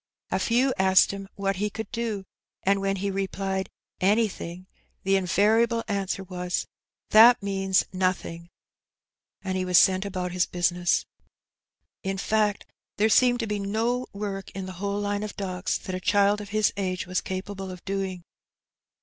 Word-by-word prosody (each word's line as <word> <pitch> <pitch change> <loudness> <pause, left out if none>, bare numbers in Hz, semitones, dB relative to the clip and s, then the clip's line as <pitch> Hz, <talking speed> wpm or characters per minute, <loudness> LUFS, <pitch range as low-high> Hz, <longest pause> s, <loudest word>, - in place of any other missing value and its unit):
A - - +1
few 255 +3 +2
asked 190 0 +5
him 195 0 -7
what 195 -1 -1
he 210 +2 0
could 220 +1 -7
do, 230 -5 -3 0.4
and 195 +1 +2
when 195 0 0
be 195 +1 -2
replied 195 0 -2 0.2
" - - -44
Anything," 185 -5 -3 0.4
the 195 - +1
iuvariable 220 +5 +3
answer 195 -2 -2
was, 180 -1 -3 0.2
" - - -60
That 225 +1 +8
means 195 -1 +1
nothing," 185 -2 -2 0.9
and 190 -1 -2
he 185 - 0
was 180 -1 +3
sent 185 +1 +5
about 185 -3 -3
his 180 0 +1
bnsiness. 175 0 +1 1.0
In 195 0 -3
fact, 210 0 0 0.3
there 215 +2 +3
seemed 245 +2 +4
to - - -1
be 210 -1 -2
no 225 +5 -1
work 200 -1 -5
in 195 -1 -4
the 185 - -6
whole 200 0 -1
line 205 0 -1
of 215 -1 -5
docks 185 -2 -2
that 185 - -7
a 185 - -2
child 205 +2 +3
of 205 - -9
his 215 0 +2
age 185 -2 -2
was 185 +1 -1
capable 190 0 -5
of 180 -1 -10
doing. 190 -2 -3
195 Hz, 165 wpm, -26 LUFS, 185-210 Hz, 1.0 s, That